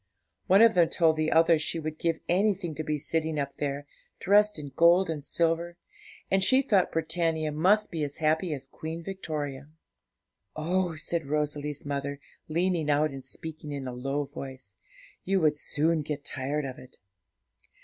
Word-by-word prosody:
One 195 Hz, +4 st, +7 dB
of 230 Hz, -1 st, +6 dB
them 170 Hz, -2 st, +4 dB
told 160 Hz, -2 st, +3 dB
the 155 Hz, 0 st, 0 dB
other 165 Hz, 0 st, +5 dB
she 160 Hz, -, -2 dB
would 155 Hz, 0 st, -5 dB
give 165 Hz, -1 st, 0 dB
anything 190 Hz, -2 st, +1 dB
to 155 Hz, -, -4 dB
be 150 Hz, 0 st, -1 dB
sitting 160 Hz, +1 st, -1 dB
up 140 Hz, -1 st, -4 dB
there, 145 Hz, 0 st, -3 dB, 0.3 s
dressed 210 Hz, +1 st, +4 dB
in 145 Hz, -2 st, -7 dB
gold 170 Hz, +1 st, +5 dB
and 150 Hz, -3 st, -5 dB
silver, 170 Hz, +3 st, 0 dB, 0.5 s
and 190 Hz, 0 st, +3 dB
she 260 Hz, +6 st, +4 dB
thought 200 Hz, -8 st, +2 dB
Britannia 160 Hz, -1 st, -1 dB
must 190 Hz, +8 st, +3 dB
be 160 Hz, -3 st, -2 dB
as 145 Hz, -1 st, -4 dB
happy 160 Hz, +2 st, +1 dB
as 135 Hz, -3 st, -4 dB
Queen 160 Hz, +4 st, -7 dB
Victoria. 150 Hz, -7 st, -5 dB, 0.9 s
'Oh,' 175 Hz, +2 st, 0 dB
said 160 Hz, -1 st, -3 dB
Rosalie's 150 Hz, -1 st, -2 dB
mother, 140 Hz, 0 st, -3 dB, 0.3 s
leaning 170 Hz, -1 st, 0 dB
out 150 Hz, +1 st, +2 dB
and 135 Hz, -1 st, -8 dB
speaking 155 Hz, +3 st, -7 dB
in 140 Hz, -2 st, -4 dB
a 125 Hz, -, -5 dB
low 135 Hz, +4 st, -2 dB
voice, 130 Hz, -7 st, -9 dB, 0.5 s
'you 195 Hz, +1 st, +1 dB
would 155 Hz, -1 st, +3 dB
soon 155 Hz, +2 st, 0 dB
get 145 Hz, -1 st, -5 dB
tired 140 Hz, +2 st, -2 dB
of 130 Hz, -1 st, -6 dB
it.' 130 Hz, -, -15 dB
155 Hz, 170 wpm, -28 LUFS, 145-170 Hz, 0.9 s, One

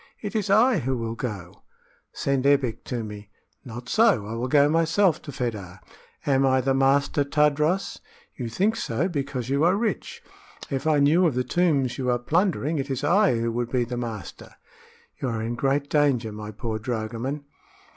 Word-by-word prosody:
It 210 Hz, 0 st, -6 dB
is 210 Hz, -3 st, -1 dB
I 220 Hz, +2 st, +4 dB
who 130 Hz, -1 st, -1 dB
will 115 Hz, -1 st, -3 dB
go!" 100 Hz, -5 st, -6 dB, 0.5 s
"Send 140 Hz, -1 st, 0 dB
Ebbek 140 Hz, -5 st, +2 dB
to 120 Hz, -3 st, -3 dB
me." 105 Hz, -1 st, -9 dB, 0.3 s
"Not 120 Hz, 0 st, -9 dB
so; 210 Hz, -, +3 dB
I 110 Hz, -, -6 dB
will 120 Hz, +2 st, -2 dB
go 145 Hz, +2 st, +4 dB
myself 165 Hz, +3 st, +2 dB
to 145 Hz, -, -8 dB
Fedah." 105 Hz, -8 st, -5 dB, 0.5 s
"Am 135 Hz, -1 st, +3 dB
I 130 Hz, -1 st, +3 dB
the 135 Hz, +1 st, +1 dB
master, 135 Hz, +2 st, +2 dB
Tadros?" 150 Hz, +6 st, +1 dB, 0.4 s
"You 120 Hz, -3 st, -5 dB
think 205 Hz, -, 0 dB
so, 210 Hz, -, -1 dB
because 140 Hz, -7 st, -3 dB
you 140 Hz, +2 st, +1 dB
are 175 Hz, +3 st, +4 dB
rich. 215 Hz, -1 st, -3 dB, 0.5 s
If 135 Hz, +2 st, -2 dB
I 155 Hz, -2 st, +4 dB
knew 155 Hz, +6 st, +4 dB
of 145 Hz, -, -1 dB
the 125 Hz, -, +1 dB
tombs 140 Hz, -7 st, +1 dB
you 125 Hz, -1 st, -1 dB
are 120 Hz, -, +2 dB
plundering, 160 Hz, +2 st, 0 dB
it 135 Hz, +1 st, -3 dB
is 135 Hz, 0 st, -3 dB
I 180 Hz, -, +3 dB
who 115 Hz, 0 st, -1 dB
would 120 Hz, 0 st, -2 dB
be 125 Hz, -2 st, +1 dB
the 120 Hz, +1 st, -5 dB
master!" 115 Hz, -7 st, -7 dB, 0.7 s
"You 135 Hz, -, -1 dB
are 115 Hz, -2 st, -2 dB
in 115 Hz, +1 st, -2 dB
great 135 Hz, +3 st, 0 dB
danger, 140 Hz, -7 st, +1 dB
my 105 Hz, 0 st, -7 dB
poor 110 Hz, +1 st, -4 dB
dragoman." 120 Hz, +5 st, -4 dB
135 Hz, 185 wpm, -25 LUFS, 120-150 Hz, 0.7 s, I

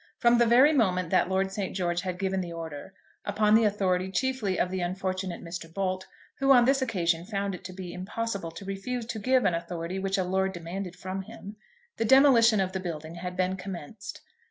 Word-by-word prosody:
From 240 Hz, -1 st, +4 dB
the 235 Hz, -, +5 dB
very 260 Hz, +6 st, +6 dB
moment 185 Hz, -, +1 dB
that -, -, +3 dB
Lord 190 Hz, 0 st, +1 dB
St. 195 Hz, -1 st, -4 dB
George 175 Hz, -2 st, 0 dB
had 185 Hz, -2 st, -4 dB
given 190 Hz, 0 st, -1 dB
the 175 Hz, -2 st, -5 dB
order, 165 Hz, +2 st, -7 dB, 0.3 s
upon 210 Hz, +1 st, +2 dB
the 225 Hz, 0 st, +6 dB
authority 190 Hz, -3 st, +1 dB
chiefly 220 Hz, -3 st, 0 dB
of 180 Hz, -, +1 dB
the 190 Hz, -, -2 dB
unfortunate 185 Hz, 0 st, -3 dB
Mr. 170 Hz, -1 st, -7 dB
Bolt, 185 Hz, 0 st, -2 dB, 0.3 s
who 275 Hz, 0 st, +4 dB
on 245 Hz, -3 st, +7 dB
this 270 Hz, +1 st, +3 dB
occasion 170 Hz, -9 st, 0 dB
found 200 Hz, 0 st, -2 dB
it 180 Hz, -, -8 dB
to 185 Hz, -, -6 dB
be 180 Hz, -1 st, -7 dB
impossible 200 Hz, 0 st, -4 dB
to 180 Hz, +4 st, -10 dB
refuse 210 Hz, +5 st, -4 dB
to 230 Hz, -1 st, -5 dB
give 255 Hz, +3 st, +2 dB
an 180 Hz, -, +3 dB
authority 170 Hz, +2 st, -4 dB
which 195 Hz, +1 st, -1 dB
a 190 Hz, -, +1 dB
lord 190 Hz, +1 st, 0 dB
demanded 180 Hz, +1 st, -6 dB
from 185 Hz, +1 st, -5 dB
him, 200 Hz, +2 st, -10 dB, 0.4 s
the 225 Hz, -, 0 dB
demolition 240 Hz, -4 st, +6 dB
of 190 Hz, -1 st, 0 dB
the 190 Hz, -, -3 dB
building 160 Hz, -3 st, -5 dB
had 180 Hz, +1 st, -6 dB
been 185 Hz, 0 st, +1 dB
commenced. 190 Hz, 0 st, -8 dB
190 Hz, 205 wpm, -28 LUFS, 180-215 Hz, 0.4 s, on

